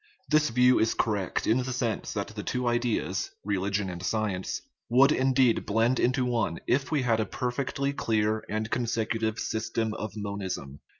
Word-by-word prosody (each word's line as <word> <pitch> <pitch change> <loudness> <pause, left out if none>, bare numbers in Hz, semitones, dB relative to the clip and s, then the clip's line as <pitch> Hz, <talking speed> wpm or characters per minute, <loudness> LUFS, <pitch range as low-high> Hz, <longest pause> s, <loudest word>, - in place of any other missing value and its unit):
This 150 0 +3
view 125 +2 +4
is 110 - +2
correct 105 -4 -1
in 115 +4 +3
the 130 0 -2
sense 120 -3 -2
that 100 -2 -3
the 110 -1 -6
two 125 +3 -2
ideas, 120 -6 0 0.2
religion 100 0 0
and 90 -1 -6
science, 95 -1 -2 0.3
would 135 +4 +6
indeed 130 -3 +3
blend 115 +4 +2
into 125 +1 +2
one 115 -9 0
if 135 +2 +1
we 145 -4 +1
had 115 -3 +2
a 110 - +1
perfectly 135 +2 -2
clear 110 -3 0
and 110 +1 -2
consec, 115 -2 -1
utive 110 -1 -1
system 110 0 -2
of 110 0 -6
monism. 95 -9 -4
115 Hz, 170 wpm, -28 LUFS, 105-125 Hz, 0.3 s, would